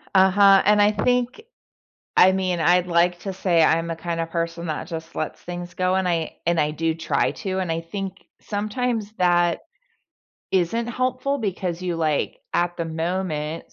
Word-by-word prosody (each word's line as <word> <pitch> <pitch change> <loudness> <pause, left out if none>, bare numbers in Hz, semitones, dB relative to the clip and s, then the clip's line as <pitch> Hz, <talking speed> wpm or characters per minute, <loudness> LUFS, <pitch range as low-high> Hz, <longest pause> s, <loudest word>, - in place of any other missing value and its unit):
Uh-huh, 195 +1 +6
and 210 +1 +5
I 205 +1 +5
think 245 - 0 0.8
I 185 - +7
mean, 185 -2 -1
I'd 180 +2 +3
like 175 0 +2
to 195 - -4
say 180 -3 +1
I'm 165 +1 +3
the 165 - -3
kind 170 0 -3
of 165 0 -3
person 170 0 -3
that 155 -1 -3
just 165 -1 -7
lets 155 - -4
things 175 0 -7
go, 185 0 +1
and 190 -1 0
I 165 -2 -1
and 170 -2 +2
I 150 - +1
do 160 +1 -1
try 165 - 0
to, 190 -1 -4
and 185 -3 -2
I 165 - -2
think 190 +3 -6 0.2
sometimes 215 +1 -2
that 175 -1 +3 0.9
Isn't 190 +6 +1
helpful 255 +3 -1
because 185 -5 -3
you, 175 -2 -2
like, 155 -3 -1 0.2
at 175 0 +1
the 170 - -2
moment, 160 -1 -3
180 Hz, 175 wpm, -23 LUFS, 165-195 Hz, 0.9 s, I